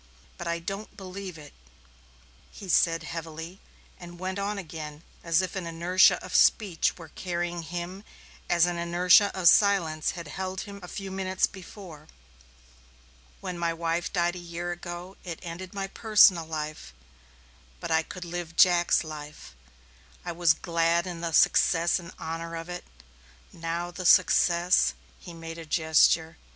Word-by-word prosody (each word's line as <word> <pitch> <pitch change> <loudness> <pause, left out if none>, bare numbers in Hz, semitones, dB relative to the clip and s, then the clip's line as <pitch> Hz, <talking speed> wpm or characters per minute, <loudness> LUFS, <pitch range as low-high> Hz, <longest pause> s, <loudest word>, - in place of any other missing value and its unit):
But 175 - -5
I 170 0 0
don't 195 +5 -7
believe 190 -2 -8
it," 150 -2 -13 1.0
he 195 - -11
said 165 -1 +3
heavily, 165 +2 -7 0.4
and 175 0 -11
went 185 +2 -4
on 200 +1 -2
again 155 -4 -8 0.2
as 170 +2 +2
if 185 - -5
an 185 -3 -4
inertia 170 +3 +4
of - - -9
speech 195 -8 +3
were 165 -3 -11
carrying 175 0 -3
him 175 +4 -6 0.5
as 170 -1 +4
an 175 -1 -2
inertia 180 +4 +5
of 175 - +3
silence 170 -7 +4
had 170 -2 -7
held 190 +3 -4
him 200 -2 -9
a 180 - -9
few 195 +1 -6
minutes 190 0 0
before. 180 -5 -11 1.3
"When 175 -1 -5
my 170 -1 0
wife 165 +1 -2
died 175 -1 0
a - - -6
year 175 0 -5
ago 175 +2 -7
it 170 -3 -6
ended 175 +2 -7
my 195 -1 -3
personal 195 -4 +4
life, 155 - -6 0.8
but - - -5
I 160 0 +4
could 180 +2 -8
live 170 -1 -6
Jack's 175 -1 +4
life. 150 - -9 0.7
I - - -3
was 170 -1 +3
glad 170 0 +1
in 175 -2 -6
the 170 -1 -2
success 170 +2 +3
and 170 0 -10
honor 165 +1 -5
of 165 +1 -7
it. 175 0 -6 0.7
Now 170 +1 -4
the 180 0 -2
success 175 +2 +4
" - - -29
he 175 - -10
made 165 0 -8
a 165 - -8
gesture. 160 0 +3
175 Hz, 155 wpm, -27 LUFS, 165-185 Hz, 1.3 s, inertia